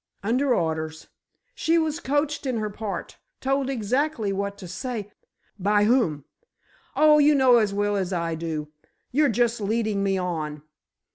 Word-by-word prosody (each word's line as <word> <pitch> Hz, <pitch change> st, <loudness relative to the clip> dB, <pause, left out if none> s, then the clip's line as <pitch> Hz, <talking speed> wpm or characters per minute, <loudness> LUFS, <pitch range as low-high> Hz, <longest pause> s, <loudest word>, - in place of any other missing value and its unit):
"Under 255 Hz, +6 st, +1 dB
orders. 160 Hz, -2 st, -3 dB, 0.4 s
She 335 Hz, -8 st, +1 dB
was 320 Hz, -1 st, 0 dB
coached 290 Hz, -1 st, -1 dB
in 250 Hz, -3 st, -1 dB
her 215 Hz, -1 st, -2 dB
part. 210 Hz, -1 st, -6 dB, 0.2 s
Told 270 Hz, 0 st, 0 dB
exactly 250 Hz, -2 st, 0 dB
what 200 Hz, +1 st, -3 dB
to 185 Hz, -, -9 dB
say——" 210 Hz, +3 st, -5 dB, 0.5 s
"By 205 Hz, +2 st, +3 dB
whom?" 205 Hz, -, +2 dB, 0.7 s
"Oh, 305 Hz, 0 st, +6 dB
you 295 Hz, 0 st, +5 dB
know 260 Hz, -3 st, +6 dB
as 215 Hz, -3 st, +2 dB
well 205 Hz, +1 st, 0 dB
as 190 Hz, -2 st, -1 dB
I 170 Hz, -2 st, -1 dB
do. 160 Hz, -2 st, -4 dB, 0.4 s
You're 295 Hz, +3 st, +3 dB
just 235 Hz, 0 st, +1 dB
leading 215 Hz, -1 st, 0 dB
me 195 Hz, -1 st, +1 dB
on! 155 Hz, -5 st, -3 dB
210 Hz, 150 wpm, -25 LUFS, 190-265 Hz, 0.7 s, Oh